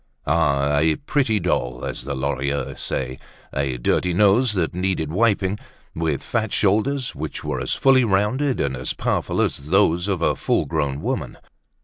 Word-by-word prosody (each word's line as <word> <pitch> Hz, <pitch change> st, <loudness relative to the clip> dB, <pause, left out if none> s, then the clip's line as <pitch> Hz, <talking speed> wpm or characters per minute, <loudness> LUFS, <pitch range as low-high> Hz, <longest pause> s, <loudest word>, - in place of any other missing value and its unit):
Ah! 75 Hz, -2 st, +2 dB
a 80 Hz, +1 st, +3 dB
pretty 135 Hz, -7 st, 0 dB
doll, 60 Hz, -9 st, -1 dB
as -, -, -5 dB
the 70 Hz, 0 st, -3 dB
Lorilleuxs 70 Hz, +1 st, -2 dB
say, 65 Hz, 0 st, -3 dB, 0.3 s
a 70 Hz, -2 st, -1 dB
dirty 85 Hz, +8 st, 0 dB
nose 105 Hz, +4 st, +4 dB
that 90 Hz, -5 st, -1 dB
needed 90 Hz, -4 st, -1 dB
wiping, 105 Hz, 0 st, +1 dB, 0.3 s
with 80 Hz, -4 st, -2 dB
fat 110 Hz, -3 st, -1 dB
shoulders, 115 Hz, +6 st, +1 dB
which -, -, -6 dB
were -, -, -2 dB
as -, -, -1 dB
fully 135 Hz, -1 st, +4 dB
rounded 115 Hz, +7 st, +1 dB
and 70 Hz, -1 st, 0 dB
as 65 Hz, 0 st, -2 dB
powerful -, -, -1 dB
as 70 Hz, +2 st, -1 dB
those 90 Hz, -1 st, +3 dB
of 95 Hz, -4 st, -1 dB
a -, -, +2 dB
full -, -, 0 dB
grown 75 Hz, -3 st, -2 dB
woman. -, -, -3 dB
85 Hz, 160 wpm, -22 LUFS, 70-105 Hz, 0.3 s, nose